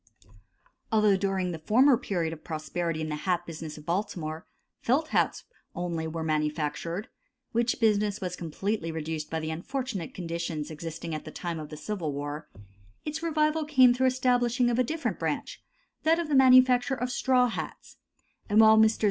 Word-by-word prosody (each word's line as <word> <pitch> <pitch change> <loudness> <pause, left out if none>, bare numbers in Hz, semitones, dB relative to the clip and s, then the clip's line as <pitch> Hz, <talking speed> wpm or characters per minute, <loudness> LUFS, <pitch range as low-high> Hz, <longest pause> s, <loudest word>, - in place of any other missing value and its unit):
Although 215 -2 +4
during 190 -2 -1
the 165 - -5
former 250 - +5
period 175 -8 -2
of 155 - -11
prosperity 160 +1 -3
in 155 - -3
the 150 - -2
hat 175 +1 -1
business 160 -2 -7
of 150 - -12
Baltimore, 170 -3 -3 0.3
felt 285 +6 +1
hats - - +1 0.3
only 170 -2 -2
were 160 0 -4
manufactured, 155 +5 -2 0.4
which 235 +1 +1
business 210 -2 +2
was 180 -2 -3
completely 175 +2 -3
reduced 160 -1 -4
by 160 - -2
the 155 0 -3
unfortunate 200 - -4
conditions 165 -3 -4
existing 165 +1 -6
at 155 - -4
the - - -8
time 170 -2 -4
of 155 -1 -7
the 150 - -8
Civil 170 -4 -3
War; 145 +2 -5 0.6
its 305 +1 -4
revival 310 -1 +1
came 260 -5 +5
through 260 +1 +3
the 255 - -3
establishing 245 -1 +2
of 240 - 0
a - - +5
different 315 +6 -3
branch, - - -3 0.4
that 320 +1 +3
of 340 -2 -2
the 290 - +2
manufacture 255 0 +6
of 250 0 -3
straw 255 0 +3
hats; 230 - -6 0.5
and 210 +1 +4
while 220 0 +8
Messrs. 220 0 +4
190 Hz, 175 wpm, -28 LUFS, 160-250 Hz, 0.6 s, while